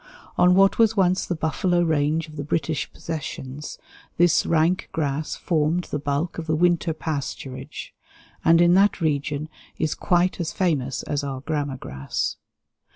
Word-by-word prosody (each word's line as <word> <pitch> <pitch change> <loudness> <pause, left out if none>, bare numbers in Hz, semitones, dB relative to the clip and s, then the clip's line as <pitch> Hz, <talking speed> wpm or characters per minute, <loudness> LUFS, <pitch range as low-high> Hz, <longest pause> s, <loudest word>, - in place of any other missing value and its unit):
On 180 0 +5
what 195 +3 +4
was 225 -1 +4
once 185 -1 +2
the 175 - -1
buffalo 175 +3 +1
range 160 0 +1
of 155 - -12
the 145 - -4
British 150 0 -2
Possessions 150 -3 -6 0.4
this 175 -1 +4
rank 170 +3 +2
grass 150 -1 -2
formed 165 +1 0
the 150 - -1
bulk 145 +5 -2
of 165 - -6
the 155 - +1
winter 175 0 +2
pasturage, 140 -4 -5 0.5
and 165 +1 +5
in 175 0 +5
that 195 +2 +4
region 150 -2 -1 0.3
is 155 -1 0
quite 180 -1 +1
as 170 -2 -2
famous 140 -9 0
as 145 0 -2
our 135 -2 -4
grama 145 -2 -2
grass. 70 - -3
160 Hz, 155 wpm, -24 LUFS, 145-175 Hz, 0.5 s, On